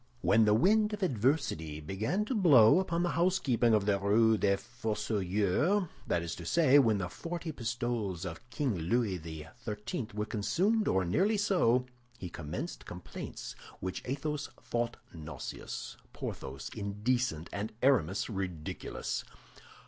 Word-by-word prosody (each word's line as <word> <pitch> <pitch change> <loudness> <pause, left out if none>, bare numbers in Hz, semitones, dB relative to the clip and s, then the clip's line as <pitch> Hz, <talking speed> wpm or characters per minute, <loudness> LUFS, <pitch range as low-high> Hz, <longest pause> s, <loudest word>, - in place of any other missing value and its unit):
When 110 -1 +5
the 105 0 +5
wind 210 - +4
of 205 -1 -3
adversity 120 - 0
began 110 - -1
to 260 - -2
blow 155 - +7
upon 175 -2 0
the 175 - +1
housekeeping 140 -10 +3
of 105 -2 +1
the 100 -1 +2
Rue 110 +3 +4
des 100 -2 +2
Fossoyeurs—that 105 - 0
is 85 - -4
to 85 - -7
say, 145 - +5
when 115 -6 +4
the 90 -2 -2
forty 165 - -5
pistoles 115 - -2
of 90 +7 -7
King 130 -1 0
Louis 95 +3 0
XIII. 105 - -6
were 105 0 -1
consumed 190 - +1
or 95 -1 +2
nearly 195 - +2
so—he 125 - 0
commenced 85 - -6
complaints 90 0 -7 0.2
which 95 0 -4
Athos 145 +3 -3
thought 120 0 -2 0.2
nauseous, 80 -3 -7 0.2
Porthos 70 0 -6
indecent, 105 -4 -1
and 100 +2 -3
Aramis 105 - +3
ridiculous. 95 -7 -4
115 Hz, 130 wpm, -31 LUFS, 95-145 Hz, 0.2 s, blow